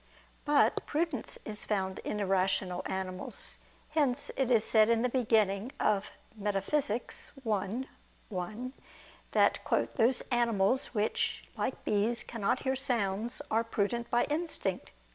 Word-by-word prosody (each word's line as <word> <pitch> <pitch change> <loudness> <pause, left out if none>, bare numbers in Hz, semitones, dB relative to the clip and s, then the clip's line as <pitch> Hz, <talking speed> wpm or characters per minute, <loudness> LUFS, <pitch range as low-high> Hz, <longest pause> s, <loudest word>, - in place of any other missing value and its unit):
But 295 -1 +3
prudence 310 -5 -1
is 210 -1 -5
found 190 -2 -1
in 210 - -3
irrational 190 -2 +1
animals: 185 -1 -2 0.3
hence 285 -4 +1
it 265 -2 +1
is 230 -4 +5
said 220 -1 +5
in 230 0 +3
the 250 - +2
beginning 220 -3 +2
of 205 -1 +1 0.3
Metaph. 200 +1 -2 0.2
i, 225 0 -3 0.4
1 215 +7 -4 0.6
that - - +4 0.4
"those 240 +3 +3
animals 235 +1 +2
which, 210 +1 0
like - - -3
bees, 220 +3 +1
cannot 225 -4 -1
hear 265 -1 0
sounds, 235 -1 +1
are 225 +1 +3
prudent 230 +1 -1
by 240 - +3
instinct." 300 - -2
225 Hz, 125 wpm, -31 LUFS, 200-250 Hz, 0.6 s, is